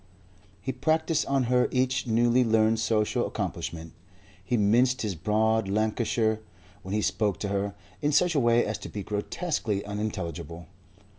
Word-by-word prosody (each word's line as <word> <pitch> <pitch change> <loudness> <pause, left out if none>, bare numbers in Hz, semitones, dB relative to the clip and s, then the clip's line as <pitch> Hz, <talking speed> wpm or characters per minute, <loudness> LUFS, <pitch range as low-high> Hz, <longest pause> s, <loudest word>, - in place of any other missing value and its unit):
He 130 - -1
practised 160 +2 0
on 135 -1 +2
her 125 +1 +2
each 130 0 0
newly 120 +2 +3
learned 110 -1 +3
social 110 -2 +1
accomplishment. 80 0 -5 0.5
He 120 +5 0
minced 120 +5 +3
his 105 -3 -1
broad 110 +5 +1
Lancashire, 110 +1 +1 0.4
when 95 +1 -4
he 105 - 0
spoke 105 -4 0
to 100 - -2
her, 100 0 -2 0.3
in 150 - +1
such 175 +4 +3
a 150 - +2
way 120 -1 +3
as 105 - -3
to - - -8
be 100 - -5
grotesquely 105 - -2
unintelligible. 90 -6 -5
110 Hz, 150 wpm, -27 LUFS, 105-125 Hz, 0.5 s, newly